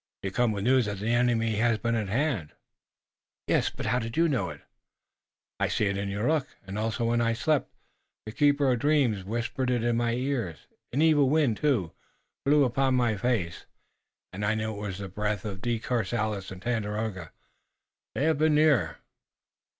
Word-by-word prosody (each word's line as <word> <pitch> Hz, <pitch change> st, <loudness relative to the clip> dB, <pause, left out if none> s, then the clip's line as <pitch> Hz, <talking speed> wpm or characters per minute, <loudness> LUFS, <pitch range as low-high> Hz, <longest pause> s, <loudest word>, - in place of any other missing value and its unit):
"You 95 Hz, -, -2 dB
come 120 Hz, +3 st, +2 dB
with 100 Hz, -2 st, -3 dB
news 125 Hz, -1 st, +3 dB
that 100 Hz, -1 st, -3 dB
the 105 Hz, +4 st, -2 dB
enemy 115 Hz, -3 st, +2 dB
has 115 Hz, 0 st, +2 dB
been 115 Hz, +3 st, -1 dB
at 110 Hz, -3 st, -1 dB
hand!" 115 Hz, -, -1 dB, 0.9 s
"Yes, -, -, +2 dB
but -, -, -7 dB
how 125 Hz, -, +1 dB
did 115 Hz, +1 st, -5 dB
you 170 Hz, +1 st, +4 dB
know 120 Hz, -, 0 dB
it?" 75 Hz, -2 st, -10 dB, 1.0 s
"I -, -, +2 dB
see 105 Hz, -, 0 dB
it 100 Hz, 0 st, 0 dB
in 100 Hz, 0 st, -3 dB
your 100 Hz, +4 st, -1 dB
look, 155 Hz, -3 st, +1 dB, 0.2 s
and, 95 Hz, +2 st, -5 dB
also 115 Hz, +2 st, -1 dB
when 120 Hz, +1 st, +2 dB
I 115 Hz, 0 st, +2 dB
slept, 150 Hz, +5 st, 0 dB, 0.5 s
the 110 Hz, -, -6 dB
Keeper 145 Hz, +1 st, +3 dB
of 125 Hz, -, +1 dB
Dreams 135 Hz, -8 st, +2 dB
whispered 120 Hz, +5 st, -2 dB
it 120 Hz, -2 st, +1 dB
in 120 Hz, -1 st, +1 dB
my 115 Hz, -1 st, +1 dB
ear. 125 Hz, -, -2 dB, 0.4 s
An 145 Hz, +5 st, +2 dB
evil 150 Hz, -4 st, +4 dB
wind, 145 Hz, -7 st, +2 dB
too, 120 Hz, -, +1 dB, 0.5 s
blew 145 Hz, +1 st, +5 dB
upon 130 Hz, +1 st, +1 dB
my 120 Hz, -3 st, +2 dB
face 100 Hz, -6 st, -2 dB, 0.7 s
and 100 Hz, +3 st, -5 dB
I 105 Hz, +1 st, +1 dB
knew 110 Hz, 0 st, -2 dB
it 105 Hz, -, -7 dB
was 100 Hz, -3 st, -4 dB
the 100 Hz, -1 st, -6 dB
breath 105 Hz, +2 st, -3 dB
of 100 Hz, -3 st, -5 dB
De 120 Hz, 0 st, 0 dB
Courcelles 110 Hz, -3 st, -2 dB
and 95 Hz, -1 st, -10 dB
Tandakora. 105 Hz, -6 st, -2 dB, 0.8 s
They 135 Hz, -, 0 dB
have 155 Hz, -2 st, +2 dB
been 155 Hz, -1 st, +3 dB
near." 145 Hz, -, +3 dB
115 Hz, 190 wpm, -27 LUFS, 105-130 Hz, 1.0 s, blew